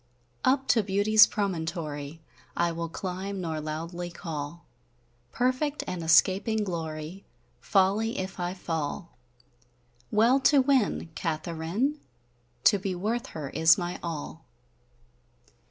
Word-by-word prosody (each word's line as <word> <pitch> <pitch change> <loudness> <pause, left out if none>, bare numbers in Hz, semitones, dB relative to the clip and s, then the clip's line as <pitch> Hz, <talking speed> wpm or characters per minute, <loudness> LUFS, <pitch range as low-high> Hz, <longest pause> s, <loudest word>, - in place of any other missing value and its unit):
Uppe 270 +1 +2
to 225 - +5
Beautie's 205 +2 +5
promontory 160 -6 -3 0.4
I 170 0 +2
will 165 0 -4
climb, 190 +3 -4
nor 160 -3 -3
loudlie 165 +3 -5
call 165 -2 -6 0.7
Perfect 255 +4 0
and 180 - -4
escaping 190 +6 +3
glory 165 0 -5 0.4
Folly, 205 +3 +2
if 190 0 -5
I 175 +1 -2
fall: 165 -2 -4 0.9
Well 230 +6 +4
to 280 +1 +5
winne 260 - +2
Katheryn! 170 - -2 0.6
To 205 0 +5
be 190 -1 -3
worth 230 +7 -2
her 145 -3 -5
is 160 +4 +5
my 175 -1 -4
all. 160 -1 -6
180 Hz, 110 wpm, -28 LUFS, 165-210 Hz, 0.9 s, to